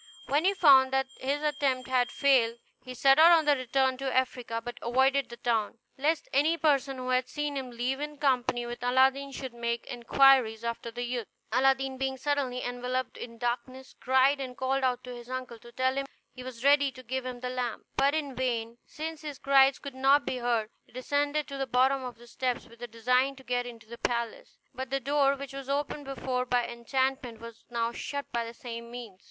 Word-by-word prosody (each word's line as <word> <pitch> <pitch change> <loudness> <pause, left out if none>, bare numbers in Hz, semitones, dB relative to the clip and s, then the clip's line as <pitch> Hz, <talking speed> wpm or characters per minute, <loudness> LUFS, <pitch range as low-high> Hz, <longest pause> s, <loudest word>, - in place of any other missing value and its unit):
When 295 +5 +1
he 395 +1 +3
found 270 -7 +6
that 265 0 +1
his 280 +3 -1
attempt 280 -4 0
had 250 -1 +2
failed, 250 -5 +3 0.3
he 255 -1 -8
set 270 +3 +5
out 330 -1 +7
to 295 - +5
return 260 -1 +1
to 270 0 -2
Africa, 250 -3 -1
but 240 +1 -8
avoided 265 +3 +2
the 235 - -9
town, 230 -2 -1 0.2
lest 300 +3 0
any 305 +5 +3
person 280 -4 +1
who 255 0 -5
had 255 0 +1
seen 295 -1 -3
him 265 -2 -4
leave 245 +3 -2
in 295 0 -5
company 250 -4 +1
with 240 0 -6
Aladdin 265 +3 +3
should 260 -2 -6
make 235 0 -3
inquiries 245 -2 +4
after 235 0 -4
the 240 +1 -5
youth. 240 -2 -3 0.2
Aladdin 265 +1 +2
being 265 0 -1
suddenly 265 -2 -1
enveloped 250 +1 -3
in 230 -1 -8
darkness, 250 +2 -4
cried, 265 +2 +3
and 255 -2 -6
called 265 +1 0
out 250 -1 0
to 250 - -7
his 240 0 -10
uncle 255 -2 -5
to 235 - -14
tell 260 +1 +1
him 275 0 -2 0.3
he 255 - -10
was 250 -2 -8
ready 285 -1 +5
to 255 - -12
give 260 +2 -3
him 250 -1 -6
the 250 0 -3
lamp; 250 -2 -3
but 280 +2 +3
in 290 -3 -2
vain, 235 -2 -2
since 315 0 -6
his 295 -3 -6
cries 270 0 +5
could 280 -2 -8
not 275 +2 +4
be 255 - -2
heard. 235 -3 0
He - - -27
descended 285 +4 -1
to 275 -1 -6
the 270 - -1
bottom 260 +2 +2
of 245 -3 -7
the 240 - -15
steps, 250 +1 -2
with 230 0 -18
a 240 - -5
design 250 +4 +1
to 265 - -15
get 245 -1 -1
into 230 -2 -11
the 235 +1 -10
palace, 235 -1 -3 0.2
but 260 0 -5
the 275 +1 0
door, 280 +1 +2
which 275 0 -8
was 275 -1 -7
opened 285 +1 -2
before 260 -2 -2
by 245 -1 +2
enchantment, 255 0 -2
was 230 0 -11
now 235 -1 -1
shut 285 +3 -5
by 235 -1 -1
the 230 0 -8
same 235 -1 -7
means. 235 -6 -9
255 Hz, 210 wpm, -29 LUFS, 240-275 Hz, 0.3 s, out